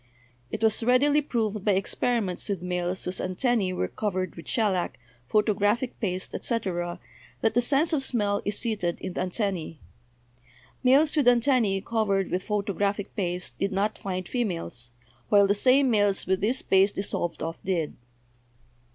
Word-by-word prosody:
It - - -4
was 220 0 +4
readily 285 +5 +4
proved 220 -7 -2
by 205 - +3
experiments 195 0 -1
with 190 -4 -2
males 180 0 -2
whose 180 +1 -1
antennae 190 +1 0
were 135 - -1
covered 185 - -3
with 165 - -11
shellac, 190 - 0 0.3
photographic 210 - +1
paste, 185 -4 -3
etc., 175 -7 -2 0.4
that 225 - +2
the 245 - +3
sense 290 +7 +2
of 295 - +2
smell 205 -6 0
is 205 - -1
seated 205 -8 -1
in 185 - -5
the - - -2
antennae. 185 -4 -2 1.0
Males 280 +5 +4
with 290 -5 +2
antennae 235 -5 +3
covered 200 -3 0
with 180 - 0
photographic 205 -1 -2
paste 180 -3 -2
did 195 +1 0
not 200 +3 0
find 185 -2 -4
females, 170 - -2 0.4
while 200 -1 +6
the 200 - +3
same 255 +5 +4
males 205 -3 +2
with 190 0 0
this 240 +6 +1
paste 195 +1 +3
dissolved 175 -5 -2
off 165 +1 -4
did. 175 -5 -1
200 Hz, 150 wpm, -26 LUFS, 185-235 Hz, 1.0 s, while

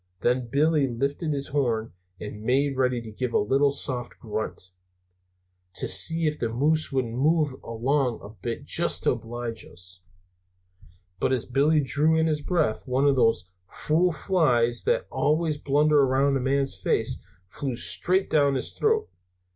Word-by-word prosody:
Then 125 0 +1
Billy 145 +3 +2
lifted 140 +6 -2
his 140 -1 -2
horn 120 -6 -1 0.3
and 105 0 -8
made 135 +4 +1
ready 125 -2 0
to 110 - -9
give 125 +3 -4
a - - +6
little 135 +7 +2
soft 130 -3 -3
grunt, 110 -4 -5 1.0
to - - +1
see 165 0 +4
if 150 0 -1
the 115 - -1
moose 150 +7 +1
wouldn't 130 -4 -1
move 145 +1 +1
along 125 +2 -1
a 100 - -9
bit, 115 +2 -6
just - - +2
to - - +3
oblige 115 0 -5
us. 90 +1 -11 1.2
But - - 0
as 130 -3 0
Billy 145 +5 +2
drew 150 +5 +2
in 160 - +2
his 155 -2 0
breath, 155 -9 -1
one 130 +2 +1
of 140 -1 +4
those 115 -8 +1 0.2
fool 170 +4 +1
flies 130 -8 +1
that - - +2
are - - -27
always 155 0 0
blundering 145 0 +3
around 135 +1 +2
a - - +1
man's 135 +1 -1
face - - 0 0.3
flew 130 +6 -4
straight 185 +9 +1
down 140 -3 +2
his 130 - -1
throat. 440 0 +1
135 Hz, 165 wpm, -25 LUFS, 120-150 Hz, 1.2 s, a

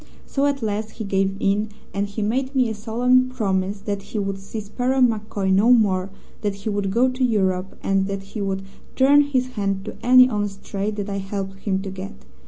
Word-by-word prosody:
So 280 +1 0
at 275 -3 -1
last 215 0 -2
he 220 - -6
gave 195 -1 0
in, 205 +2 +1 0.2
and 200 +1 -1
he 205 +1 -4
made 260 +6 -1
me 255 -3 +3
a - - -2
solemn 245 +4 +2
promise 195 -4 -1
that 200 -1 -3
he 210 - -7
would 195 -1 -2
see 195 +3 -6
Sparrow 245 +6 -1
MacCoy 210 -5 +1
no 210 +6 +5
more, 195 -5 +2 0.3
that 205 -2 -1
he 200 +2 -5
would 200 -1 -1
go 235 +6 +3
to 255 0 -2
Europe, 190 -5 0
and 195 0 +1
that 195 -1 -4
he 200 +2 -7
would 195 -1 -2 0.3
turn 280 +2 +6
his 260 -3 0
hand 195 -4 -2
to 215 - -6
any 255 +1 +8
honest 205 -4 -3
trade 205 +1 -3
that 205 -1 -3
I 200 -1 -3
helped 195 0 -5
him 195 -1 -1
to 195 - -5
get. 190 - -8
205 Hz, 210 wpm, -22 LUFS, 195-240 Hz, 0.3 s, any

